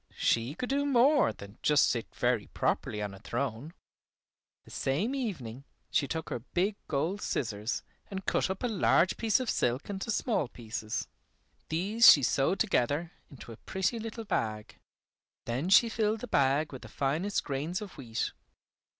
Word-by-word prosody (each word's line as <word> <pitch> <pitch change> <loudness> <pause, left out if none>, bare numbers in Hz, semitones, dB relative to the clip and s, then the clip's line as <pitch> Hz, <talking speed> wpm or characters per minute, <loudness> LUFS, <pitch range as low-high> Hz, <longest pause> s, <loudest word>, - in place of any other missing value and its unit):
She 120 +5 +1
could 250 +6 -4
do 280 +1 +1
more 280 +1 +4
than 100 +1 -12
just 150 -1 +4
sit 120 -2 -1
very 120 -3 +1
properly 105 0 -1
on 100 -1 -4
a 95 - -11
throne. 120 +5 -3 0.9
The - - -15
same 170 - -1
evening, 140 - -4 0.3
she 140 - +2
took 160 +1 -4
her - - -2
big 180 - -1
gold 160 +8 -1
scissors 110 -2 -2 0.3
and 195 -1 -6
cut - - +1
up 190 +4 -4
a - - +2
large 190 -4 +3
piece 225 +1 +2
of 255 - -3
silk 125 - 0
into 195 +3 -5
small 220 - 0
pieces. 110 -2 -5 0.6
These 200 +8 +7
she 140 - +5
sewed 140 +10 +2
together 165 - +1 0.2
into 130 -3 -11
a 110 - -10
pretty 190 - -2
little 225 0 -6
bag. 110 - -3 0.7
Then 130 +9 -2
she 210 +5 +7
filled 220 -1 0
the 245 - -5
bag 140 - +2
with 130 - -8
the - - -10
finest 160 +9 -1
grains 150 +6 -2
of 205 -3 -9
wheat. 115 -6 -3
155 Hz, 165 wpm, -30 LUFS, -, 0.9 s, These